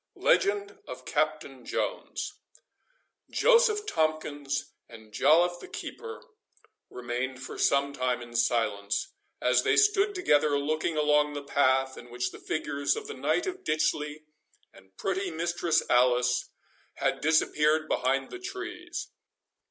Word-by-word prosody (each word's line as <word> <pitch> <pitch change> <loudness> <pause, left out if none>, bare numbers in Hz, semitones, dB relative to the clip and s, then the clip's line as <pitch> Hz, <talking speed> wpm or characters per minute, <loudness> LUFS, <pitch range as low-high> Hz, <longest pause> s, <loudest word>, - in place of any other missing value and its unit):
LEGEND 405 -4 +1
OF - - -8
CAPTAIN - - -2
JONES. - - -3 1.0
Joseph 465 -4 +4
Tomkins 150 - -1 0.2
and 110 -2 -14
Joliffe 170 +9 +4
the - - -10
keeper 455 -1 -8 0.7
remained 125 +1 -4
for - - -8
some 140 0 +2
time 125 -2 0
in 120 -1 -10
silence, 105 -4 0 0.3
as 125 0 +3
they - - +2
stood 410 -1 +4
together 150 - +3
looking 155 +2 -1
along 150 0 +3
the 145 -1 -5
path 135 -1 +2
in 120 - -13
which 125 +1 -3
the - - -11
figures 140 -2 -1
of 445 - -6
the 440 - -6
Knight - - 0
of 375 0 -5
Ditchley 155 - -1 0.5
and 95 0 -20
pretty 195 0 -1
Mistress 170 0 0
Alice 125 0 +3 0.5
had - - -1
disappeared 155 0 +2
behind 135 0 0
the 375 - -7
trees. 360 -2 -6
150 Hz, 130 wpm, -28 LUFS, -, 1.0 s, Joseph